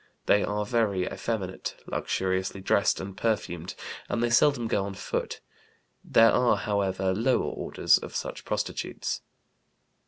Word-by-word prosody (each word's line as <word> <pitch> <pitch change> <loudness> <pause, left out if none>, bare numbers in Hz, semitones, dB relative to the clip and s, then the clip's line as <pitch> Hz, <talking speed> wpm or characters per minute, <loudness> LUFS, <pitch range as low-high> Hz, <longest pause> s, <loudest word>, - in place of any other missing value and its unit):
They 105 - +4
are 105 0 -1
very 105 -5 +1
effeminate, 95 -5 -3
luxuriously 95 +1 -1
dressed 100 +1 +2
and 95 0 -6
perfumed, 90 -6 -2 0.3
and 115 - 0
they 120 - +1
seldom 125 0 +4
go 110 -3 +1
on 100 0 -5
foot. - - -3 0.6
There 115 0 +6
are, 125 -1 +3
however, 95 -2 0
lower 120 +6 +1
orders - - +2
of - - -8
such - - -4
prostitutes. - - -3
100 Hz, 130 wpm, -27 LUFS, 95-115 Hz, 0.6 s, There